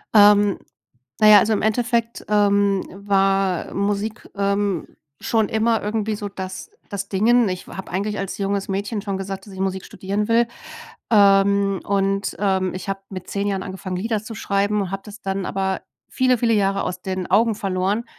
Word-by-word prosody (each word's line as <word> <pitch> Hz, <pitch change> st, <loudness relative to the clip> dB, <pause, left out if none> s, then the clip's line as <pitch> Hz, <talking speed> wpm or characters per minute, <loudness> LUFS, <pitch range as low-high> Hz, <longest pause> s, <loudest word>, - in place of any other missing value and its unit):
Ähm, 205 Hz, -1 st, +6 dB, 0.6 s
na 215 Hz, -, +6 dB
ja, 210 Hz, -, +10 dB
also, 220 Hz, +3 st, +2 dB
im 210 Hz, -, 0 dB
Endeffekt, 235 Hz, +1 st, 0 dB
ähm, 200 Hz, -2 st, +3 dB
war 195 Hz, -2 st, +1 dB
Musik, 205 Hz, +2 st, -2 dB
ähm, 200 Hz, -2 st, 0 dB, 0.3 s
schon 220 Hz, -3 st, +1 dB
immer 225 Hz, +1 st, +1 dB
irgendwie 215 Hz, +1 st, -1 dB
so, 205 Hz, -1 st, -5 dB
das 190 Hz, -, -7 dB, 0.2 s
das 200 Hz, -1 st, -5 dB
Dingen. 225 Hz, +2 st, +3 dB
Ich 185 Hz, 0 st, -5 dB
f -, -, -10 dB
habe 190 Hz, -, -7 dB
eigentlich 205 Hz, +3 st, -2 dB
als 195 Hz, -1 st, -4 dB
junges 200 Hz, 0 st, -1 dB
Mädchen 200 Hz, +2 st, -2 dB
schon 200 Hz, -2 st, -3 dB
gesagt, 195 Hz, 0 st, -6 dB
dass 200 Hz, -, -12 dB
ich 190 Hz, -, -9 dB
Musik 190 Hz, -1 st, -2 dB
studieren 200 Hz, +3 st, -3 dB
will. 235 Hz, +1 st, +4 dB, 0.6 s
Ähm, 200 Hz, -1 st, +4 dB
und, 195 Hz, 0 st, 0 dB
ähm, 190 Hz, -2 st, +1 dB
ich 185 Hz, +1 st, -7 dB
habe 195 Hz, 0 st, -3 dB
mit 185 Hz, -2 st, -7 dB
10 200 Hz, 0 st, -2 dB
Jahren 195 Hz, -2 st, -1 dB
angefangen, 190 Hz, -1 st, -6 dB
Lieder 215 Hz, +2 st, -2 dB
zu 225 Hz, -, -8 dB
schreiben 200 Hz, +1 st, 0 dB
und 190 Hz, -, -4 dB
habe 195 Hz, 0 st, -4 dB
das 210 Hz, +1 st, -11 dB
dann 195 Hz, -1 st, -2 dB
aber 190 Hz, 0 st, -2 dB, 0.3 s
viele, 255 Hz, -1 st, +2 dB
viele 230 Hz, -1 st, +2 dB
Jahre 195 Hz, -2 st, +1 dB
aus 180 Hz, 0 st, -4 dB
den 185 Hz, -1 st, -3 dB
Augen 230 Hz, 0 st, +4 dB
verloren. 195 Hz, +3 st, -1 dB
200 Hz, 180 wpm, -22 LUFS, 195-210 Hz, 0.6 s, ja